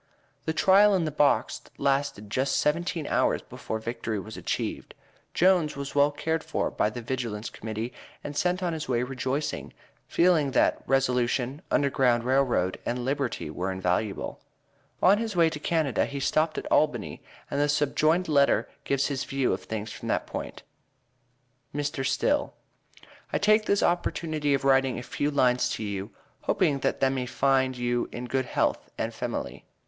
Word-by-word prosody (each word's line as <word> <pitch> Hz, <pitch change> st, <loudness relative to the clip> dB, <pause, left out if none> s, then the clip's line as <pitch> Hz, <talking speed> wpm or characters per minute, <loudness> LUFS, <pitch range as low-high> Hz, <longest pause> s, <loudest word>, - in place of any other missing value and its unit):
The 160 Hz, -, 0 dB
trial 200 Hz, +4 st, +5 dB
in 175 Hz, -3 st, +1 dB
the 155 Hz, -, -2 dB
box 145 Hz, 0 st, +2 dB, 0.2 s
lasted 135 Hz, -6 st, -1 dB
just 135 Hz, +4 st, +1 dB
seventeen 165 Hz, +1 st, 0 dB
hours -, -, +1 dB
before 110 Hz, -, -5 dB
victory 110 Hz, -1 st, -4 dB
was 110 Hz, +3 st, -8 dB
achieved. -, -, -4 dB, 0.4 s
Jones 175 Hz, -4 st, +3 dB
was 140 Hz, 0 st, -5 dB
well 145 Hz, 0 st, +4 dB
cared 160 Hz, +2 st, -2 dB
for 160 Hz, -, -2 dB
by -, -, +1 dB
the 120 Hz, +2 st, -7 dB
Vigilance 115 Hz, -4 st, -3 dB
Committee 110 Hz, +3 st, -5 dB, 0.3 s
and 145 Hz, -, -6 dB
sent 180 Hz, +4 st, 0 dB
on 175 Hz, -2 st, 0 dB
his 155 Hz, -4 st, -5 dB
way 120 Hz, -1 st, +1 dB
rejoicing, 135 Hz, +3 st, -3 dB, 0.3 s
feeling 170 Hz, -5 st, +3 dB
that -, -, +3 dB
Resolution, 125 Hz, +1 st, +1 dB
Underground 130 Hz, -4 st, +2 dB
Rail 130 Hz, +2 st, +3 dB
Road, 95 Hz, -8 st, 0 dB
and 120 Hz, 0 st, -2 dB
Liberty 135 Hz, -, -2 dB
were 90 Hz, +4 st, -2 dB
invaluable. 95 Hz, +2 st, -2 dB, 0.6 s
On 200 Hz, +3 st, +6 dB
his 225 Hz, -3 st, -3 dB
way 165 Hz, -2 st, +4 dB
to 150 Hz, -, -5 dB
Canada, 155 Hz, -7 st, +1 dB
he 140 Hz, -, -5 dB
stopped 155 Hz, +3 st, +1 dB
at -, -, -3 dB
Albany, 125 Hz, -9 st, +1 dB, 0.3 s
and 140 Hz, -, 0 dB
the 145 Hz, -, +2 dB
subjoined 155 Hz, +4 st, +2 dB
letter 140 Hz, -3 st, +3 dB, 0.2 s
gives 140 Hz, 0 st, +1 dB
his 135 Hz, -3 st, -2 dB
view 135 Hz, -2 st, 0 dB
of -, -, -3 dB
things 110 Hz, 0 st, -4 dB
from -, -, -8 dB
that -, -, +1 dB
stand -, -, -18 dB
point -, -, -6 dB, 1.1 s
MR. 145 Hz, -2 st, -2 dB
STILL: 285 Hz, -, 0 dB, 0.8 s
I -, -, +1 dB
take 215 Hz, +1 st, +3 dB
this 200 Hz, -, +2 dB
opportunity 155 Hz, -4 st, 0 dB
of 135 Hz, -, -3 dB
writing 135 Hz, -1 st, +3 dB
a 120 Hz, -, -5 dB
few 145 Hz, +4 st, -2 dB
lines 125 Hz, -3 st, +2 dB
to 110 Hz, -, -3 dB
you 100 Hz, -1 st, -4 dB, 0.3 s
hoping 150 Hz, -7 st, +1 dB
that -, -, -1 dB
tha 135 Hz, -, +4 dB
may 130 Hz, -2 st, -2 dB
find 130 Hz, 0 st, +1 dB
you 120 Hz, 0 st, -1 dB
in 120 Hz, -, -5 dB
good 130 Hz, +1 st, -1 dB
health -, -, 0 dB
and -, -, -2 dB
femaly. -, -, -4 dB
135 Hz, 170 wpm, -27 LUFS, 125-155 Hz, 1.1 s, On